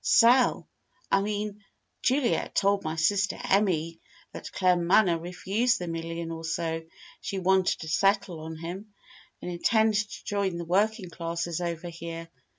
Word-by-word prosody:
sell 245 +2 +5 0.4
I 195 - +4
mean, 210 0 -3 0.4
Juliet 260 -1 +1
told 200 0 +2
my 155 0 -3
sister 195 +4 +1
Emmy 165 -5 +1 0.3
that - - -8
Claremanagh 180 -1 +3
refused 200 +7 0
the 175 - -5
million 165 0 -4
or 165 0 -6
so 165 0 -2 0.4
she 195 - -4
wanted 190 0 +2
to 160 - -6
settle 195 +1 +1
on 160 +1 -7
him, 185 +6 -8 0.5
and 180 - -4
intended 220 +4 +2
to - - -10
join 200 -3 -1
the 170 - -5
working 200 +2 +1
classes 170 0 -3
over 170 0 -3
here. 165 0 -7
180 Hz, 145 wpm, -27 LUFS, 165-205 Hz, 0.5 s, sell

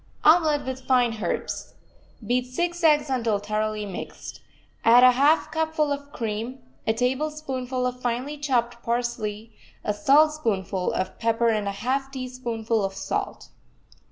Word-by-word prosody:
OMELET 310 -2 +5
WITH 260 0 -4
FINE 250 -3 +4
HERBS 210 -6 -4 0.5
Beat 250 +3 0
six 345 +6 -2
eggs 300 -2 +5
until 235 -5 +1
thoroughly 215 +1 -2
mixed. 195 -3 -8 0.4
Add 240 +2 +7
a 255 - +9
half 285 +6 +3
cupful 315 -2 0
of 285 0 -4
cream, 230 +1 -4 0.3
a 220 - +3
tablespoonful 260 0 -2
of 250 0 -3
finely 250 +5 -2
chopped 240 -4 0
parsley, 230 -2 -3 0.3
a 210 - 0
saltspoonful 255 - +2
of 185 - -3
pepper 230 0 +2
and 215 -2 0
a - - 0
half 260 +7 -2
teaspoonful 240 -4 -2
of 195 0 -2
salt. - - -4
250 Hz, 135 wpm, -25 LUFS, 220-280 Hz, 0.5 s, a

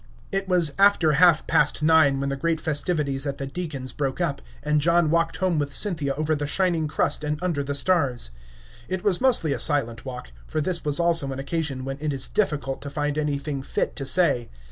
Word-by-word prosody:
It 195 -1 -2
was 175 -5 +3
after 195 -6 +5
half 165 +2 +4
past 150 +1 +1
nine 155 -4 +4
when 140 0 -2
the 140 - -2
great 160 +3 -1
festivities 150 -3 0
at 140 0 -3
the 140 - -4
Deacon's 135 -4 -6
broke 135 -2 -3
up, - - -1 0.2
and 150 0 +1
John 170 0 +3
walked 165 0 +1
home 180 -2 0
with 145 -1 -2
Cynthia 155 -9 +2
over 155 +2 0
the 145 -1 -2
shining 170 -2 +1
crust 150 - -1
and 150 0 -1
under 170 -6 0
the 140 +1 -3
stars. 140 - +1 0.6
It 185 -1 -3
was 200 -1 +2
mostly 235 - +3
a - - -4
silent 120 -7 +1
walk, 125 - -8 0.2
for - - -2
this 170 +2 -1
was 150 +1 0
also 170 -5 +1
an 135 - -5
occasion 140 -2 -3
when 135 0 -4
it 150 -1 -2
is 135 -1 -2
difficult 145 -10 -1
to 140 - -6
find 145 0 -2
anything 145 -2 -2
fit - - -2
to 135 - -4
say. 150 -10 +2
150 Hz, 210 wpm, -24 LUFS, 140-170 Hz, 0.6 s, after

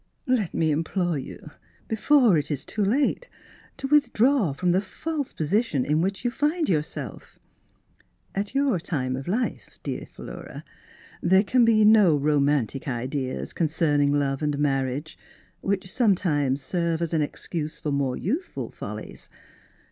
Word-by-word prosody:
" - - -45
Let 250 - 0
me 160 -1 +2
implore 165 +1 0
you, 130 - -9 0.4
before 235 -1 +4
it 150 - 0
Is 140 -3 -3
too 210 - -2
late, 280 - +1 0.5
to 270 - -5
withdraw 270 - +3
from 175 +6 0
the 185 +2 +3
false 295 +8 -4
position 160 - 0
in 150 +2 +2
which 195 +5 -2
you 245 - +2
find 300 +5 0
yourself. 155 -3 -3 1.0
At 200 +5 -3
your 275 -8 +2
time 130 -6 -2
of 135 +1 -6
life, 230 +7 -1
my - - -25
dear - - -4
Philura, - - -9 0.6
there 190 +3 +4
can 240 +4 +3
be 215 -2 +5
no 210 -8 +6
jomantic 140 -3 +1
Ideas 130 +1 -3
concerning 150 -3 +2
love 140 -1 0
and 150 -1 0
mar 135 -2 +1
riage, 140 +5 -5 0.4
which 195 -1 -2
sometimes 150 - +1
serve 170 -1 -1
as 170 - -3
an 160 - +2
excuse 155 +1 -4
for 150 - -3
more 140 -2 0
youthful 290 - -3
follies. - - -8
170 Hz, 150 wpm, -25 LUFS, 145-220 Hz, 1.0 s, no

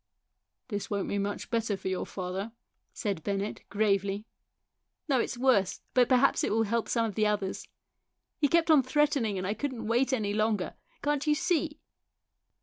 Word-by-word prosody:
" - - -56
This 205 -3 -3
won't 200 -2 -1
be 200 - 0
much 200 +2 -3
better 225 -3 0
for - - -6
your 185 -1 -2
father," 190 +4 -4 0.4
said 200 -6 -3
Bennett 200 +1 -2
gravely. 200 0 +1 0.4
" - - -56
No, 270 -4 +3
it's 240 - -2
worse; 240 -7 +2
but 250 -1 +4
perhaps 255 +1 +4
it - - +1
will 225 +1 +3
help 225 +2 -1
some 230 -2 +2
of 220 - -3
the 215 +2 +2
others. 205 -2 -2 0.7
He 295 - +4
kept 335 +2 +3
on 300 -3 +7
threatening 265 -6 +1
and 185 - -3
I 200 - 0
couldn't 260 0 -4
wait 240 +4 +2
any 215 -6 0
longer. 215 -2 0 0.3
Can't 295 +1 0
you 300 - +4
see?" 315 -2 0
220 Hz, 180 wpm, -29 LUFS, 200-265 Hz, 0.7 s, on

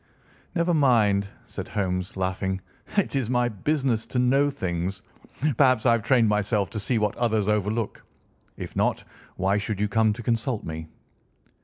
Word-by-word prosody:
"Never 170 0 +2
mind," 110 -9 +3 0.2
said - - -7
Holmes, 95 0 -2
laughing; 95 0 -1 0.4
"it 200 - +1
is 130 -4 0
my 125 -1 +2
business 125 +1 0
to - - -4
know 135 +3 +3
things. 95 -5 -3 0.5
Perhaps 130 -5 +4
I 120 - +6
have 115 -1 +3
trained 120 0 +3
myself 105 0 +1
to 110 - -3
see 115 +4 0
what 105 -2 0
others 110 -4 +1
overlook. 105 +1 -1 0.5
If - - -7
not, - - +1 0.3
why 95 +2 +2
should 105 0 -3
you 105 - +2
come 110 0 +3
to 120 - -8
consult 115 0 -1
me?" 80 0 -6
110 Hz, 160 wpm, -25 LUFS, 100-125 Hz, 0.5 s, I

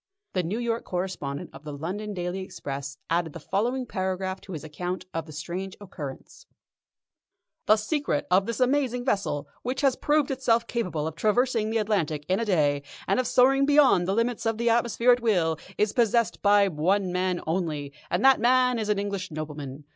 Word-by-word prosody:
The 185 - +1
New 180 +6 -3
York 235 -1 -1
correspondent 175 -6 -4
of 145 - -12
the 150 -2 -7
London 200 +7 -4
Daily 180 +1 -3
Express 140 -6 -6
added 165 -2 0
the - - -7
following 240 - -1
paragraph 190 -2 -3
to 190 - -9
his 155 - -6
account 180 +4 -4
of 165 -1 -3
the - - -10
strange 180 +6 -5
occurrence: 155 -9 -9 1.2
"The 215 - +7
secret 245 - -1
of 190 +2 +4
this 230 +1 -3
amazing 255 -2 +1
vessel, 195 - -1
which 255 +3 -2
has 275 -3 +3
proved 295 -2 +1
itself 240 -3 +2
capable 180 -11 -2
of 160 0 -4
traversing 220 +4 +1
the 225 - 0
Atlantic 170 -9 0
in 185 +1 +1
a 230 - -1
day, 150 -8 +2 0.3
and - - +2
of 255 - 0
soaring 270 +2 +4
beyond 285 -12 +5
the 195 - +1
limits 230 0 0
of 225 -1 0
the 235 0 +2
atmosphere 235 +1 +3
at 245 0 +3
will, 170 -8 +1 0.2
is 210 -1 +1
possessed 235 -3 +2
by 205 0 +5
one 185 +3 +1
man 180 0 0
only, 155 -4 -2 0.2
and 180 +8 +1
that 270 -1 +7
man 250 +1 +3
is 215 -1 -2
an 210 - +2
English 200 -2 -3
nobleman. 150 -3 -6
195 Hz, 185 wpm, -26 LUFS, 165-235 Hz, 1.2 s, The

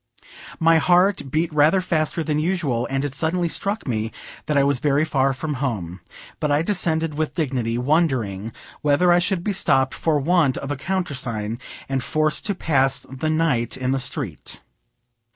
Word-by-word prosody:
My 165 0 +5
heart 180 -3 +3
beat 155 +3 0
rather 150 +5 +4
faster 165 -2 0
than 150 -1 0
usual, 155 -8 0
and 135 +1 -1
it 140 - -4
suddenly 170 +5 0
struck 200 +3 -2
me 110 -2 -1 0.4
that 150 -1 +1
I 140 - +5
was 140 -2 +1
very 145 +3 +2
far 135 -3 +1
from 150 +3 -3
home; 95 - -3 0.4
but 150 - 0
I 145 +2 +2
descended 165 -4 0
with 155 - -1
dignity, 125 -7 -1
wondering 125 - 0 0.3
whether 150 +5 +3
I 175 - +5
should 175 0 0
be 205 - -1
stopped 135 -8 +2
for 160 -2 +1
want 155 -2 +2
of 140 - -5
a - - -1
countersign, 130 - -3 0.3
and 135 -2 -1
forced 155 +3 0
to 200 - -1
pass 135 -6 +1
the 135 +4 -2
night 155 -7 0
in 130 0 -1
the 135 - +1
street. 130 - -4
150 Hz, 170 wpm, -22 LUFS, 130-165 Hz, 0.4 s, My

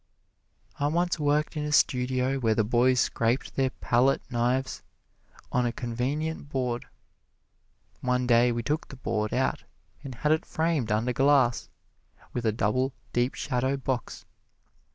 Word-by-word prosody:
I 145 - +2
once 175 +3 0
worked 150 +1 +1
in 150 - -2
a 150 - -3
studio 130 -1 +2
where 110 -3 +2
the 110 - +2
boys 125 +3 +3
scraped 115 +3 0
their 135 -1 +2
palette 130 +1 +1
knives 125 +2 0 0.7
on 125 -1 +2
a - - -1
convenient 140 +7 -3
board. 125 -3 -2 1.1
One 125 0 0
day 120 0 +4
we 120 0 -2
took 150 +5 -1
the 135 - -10
board 110 -4 -2
out 130 +1 0 0.4
and 135 -3 -7
had 150 +6 0
it 160 - +2
framed 160 -9 -1
under 115 +4 +1
glass, 135 -2 +3 0.6
with 120 -2 -1
a - - +4
double, 125 +6 0 0.2
deep 120 +2 +1
shadow 130 0 -1
box. 130 -3 -4
125 Hz, 145 wpm, -27 LUFS, 120-140 Hz, 1.1 s, day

